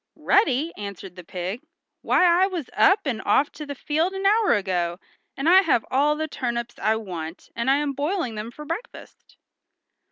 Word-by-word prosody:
"Ready!" 330 - +2
answered 200 -3 -8
the 180 - -10
pig. 185 +7 -5 0.4
"Why 365 - +3
I 355 +2 +5
was 350 -8 -5
up 400 0 +4
and 245 -6 -2
off 285 - +2
to 300 -1 -9
the 285 - -5
field 315 +7 -1
an 385 0 -4
hour 425 +2 +4
ago 180 -3 -1 0.4
and 275 +3 -2
I 370 +3 +8
have 295 - +1
all 290 +3 +3
the 315 +1 -3
turnips 240 -4 -4
I 220 +1 +2
want, 175 -6 -7
and 235 +3 -1
I'm 285 +1 +2
boiling 290 - -2
them 215 +1 -5
for 300 +5 -10
breakfast." 345 +11 -8
275 Hz, 180 wpm, -24 LUFS, 215-335 Hz, 0.4 s, I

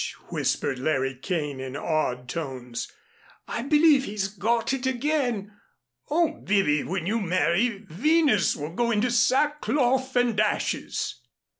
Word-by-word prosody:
whispered 135 -3 -1
Larry 135 -1 0
Kane, 150 0 -3
in 130 +1 -5
awed 135 -6 -1
tones, 125 -5 -5 0.6
"I - - -3
believe 295 0 +4
he's 200 -1 -2
got 225 +6 0
it 265 -1 -2
again. 250 -6 -1 0.6
Oh, 325 +2 +1
Bibby, 185 -8 +2
when 185 -2 -3
you 220 +4 0
marry, 195 +4 +1
Venus 285 - +2
will 150 +3 -6
go 235 +5 0
into 235 +2 +1
sackcloth 260 +1 +2
and 240 -3 +2
ashes!" 215 0 -1
210 Hz, 125 wpm, -26 LUFS, 155-255 Hz, 0.6 s, believe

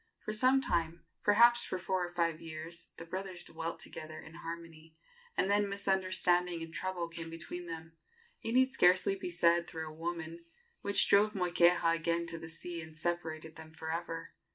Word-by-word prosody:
For 215 - -2
some 255 +5 +4
time 170 -7 -1 0.2
perhaps 235 +3 +6
for 185 - -2
four 185 0 -1
or 175 - -3
five 165 -2 0
years 165 +1 -7
the 165 - -7
brothers 185 0 -5
dwelt 165 0 -5
together 155 0 -7
in 160 - -12
harmony, 165 -1 -8 0.4
and - - +3
then 205 0 +3
misunderstanding 185 -3 +1
and 165 0 -9
trouble 185 -2 -2
came 165 0 -6
between 170 +2 -7
them 165 0 -7 0.5
it 225 - -2
need 260 +1 +5
scarcely 185 -5 +5
be 190 -2 -4
said, 170 0 +3
through 160 -1 -5
a 155 - -8
woman 165 0 -5 0.4
which 200 0 +4
drove 210 +2 +5
Moikeha 175 -2 +4
again 170 +1 0
to 165 -1 -6
the 160 0 -8
sea 170 +1 -5
and 160 -1 -11
separated 160 -1 -3
them 160 0 -9
for 160 0 -6
ever. 165 0 -4
170 Hz, 175 wpm, -33 LUFS, 165-185 Hz, 0.5 s, perhaps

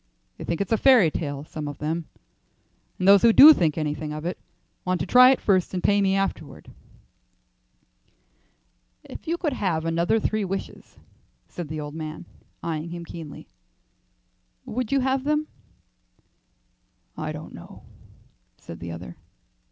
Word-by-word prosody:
They - - -6
think 170 +1 -2
it's 200 - -3
a 225 - +3
fairy 245 - +5
tale; 145 -3 -4
some 155 0 -7
of 145 -1 -7
them, 160 +2 -3 0.9
and 185 - -1
those 200 -1 +7
who 235 - +6
do 295 +7 +10
think 165 - 0
anything 150 0 -3
of 155 +1 -6
it 175 - -4 0.4
want 185 -1 -1
to - - -1
try 250 +1 +7
it 265 - +3
first 190 -2 +1
and 180 - -3
pay 205 0 +3
me 195 -1 +2
afterward." 195 -6 -4 2.3
"If - - -11
you 335 +2 -1
could 310 -5 -2
have 170 -9 -1
another 170 +6 +1
three 215 0 -1
wishes," 195 0 -6 0.5
said 175 -3 -7
the 155 +1 -5
old 150 -1 -6
man, 155 +1 -7 0.4
eyeing 165 0 -4
him 170 0 -7
keenly, 165 -3 -10 1.2
"would 250 -1 -4
you 275 -1 +2
have 265 0 0
them?" 300 +1 0 1.7
"I - - -4
don't - - -9
know," - - -13 0.7
said 85 - -11
the 85 0 -7
other. 85 +1 -9
175 Hz, 150 wpm, -24 LUFS, 155-215 Hz, 2.3 s, do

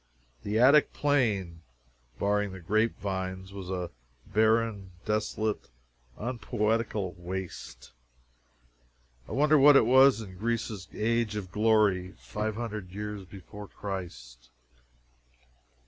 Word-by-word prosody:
The 105 - -2
Attic 140 +5 +5
Plain, 105 - 0 0.6
barring 100 +2 0
the 95 - -8
grape 110 +6 +1
vines, 95 -1 -4
was 95 -2 -7
a 90 -2 -3 0.3
barren, 110 -2 +1
desolate, 110 0 -1 0.5
unpoetical 110 -4 -1
waste 90 +1 -7 1.4
I - - -5
wonder 150 +1 +4
what 145 +1 +8
it 115 - +5
was 130 +1 +6
in 95 -4 -9
Greece's 110 -4 -2
Age 115 0 0
of 95 -4 -5
Glory, 105 -4 +2
five 105 0 -4
hundred 105 -5 -5
years 105 0 -6
before 100 +3 -11
Christ? 85 -14 -7
105 Hz, 105 wpm, -29 LUFS, 95-115 Hz, 1.4 s, what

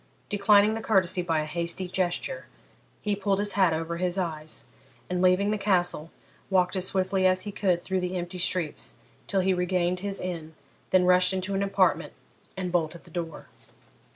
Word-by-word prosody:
Declining 205 +1 +4
the 225 - -3
courtesy 190 -5 +2
by 165 -3 0
a - - -3
hasty 170 +3 -2
gesture, 185 - -2 0.6
he 210 -1 0
pulled 200 -1 0
his 205 +1 -2
hat 190 -4 +4
over 165 +1 -2
his 180 +1 -1
eyes, 155 -4 -4 0.5
and, 180 0 0
leaving 185 +3 +3
the 215 - -1
Castle, 180 -5 +1 0.4
walked 185 -1 +2
as 185 0 0
swiftly 190 0 +1
as 185 0 +1
he 205 - -5
could 185 -4 0
through 190 -1 -1
the 180 0 -2
empty 175 +1 -5
streets 180 -3 0 0.3
till 195 -1 +2
he 190 +1 +2
regained 180 0 0
his 200 +1 -4
inn, 165 -3 -5 0.3
then 185 -1 +4
rushed 180 +1 +5
into 190 +1 -2
an 195 - 0
apartment 200 0 +1 0.4
and 180 -1 -3
bolted 170 -1 -1
the 170 - -18
door. 165 -2 -5
185 Hz, 180 wpm, -27 LUFS, 175-195 Hz, 0.6 s, rushed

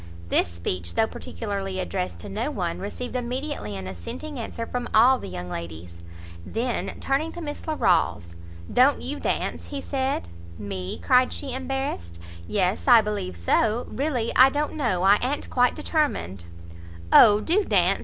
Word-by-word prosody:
This - - +3
speech, 85 0 -3
though 225 - +4
particularly 200 -4 -5
addressed 90 - -3
to - - -8
no - - -2
one, 85 - -3
received 250 - -5
immediately 250 - -3
an 95 - -6
assenting 95 - -6
answer 230 0 -5
from 245 +1 -4
all 250 +4 +6
the - - -7
young 90 0 -6
ladies. 85 0 -7 0.4
Then, 235 - -3
turning 285 +4 0
to - - -7
Miss 295 -2 -6
Larolles, 170 - +1 0.4
"Don't 265 +3 +4
you 290 +3 -3
dance?" - - -2
he 285 - -5
said. 265 - -2 0.3
"Me?" 95 -3 -5
cried 255 -1 +3
she, 270 -3 -4
embarrassed, 260 - -4 0.3
"yes, 190 +3 0
I 240 -3 +8
believe 210 - -3
so, 215 - +1
really 260 -5 -1
I 260 +1 +8
don't 295 +2 -2
know, 230 - 0
I 200 +2 +6
a'n't 275 +4 -2
quite 250 -1 +3
determined." 285 - -1 0.7
"O, 210 -2 +8
do 355 - +2
dance!" 195 - +3
230 Hz, 155 wpm, -25 LUFS, -, 0.7 s, I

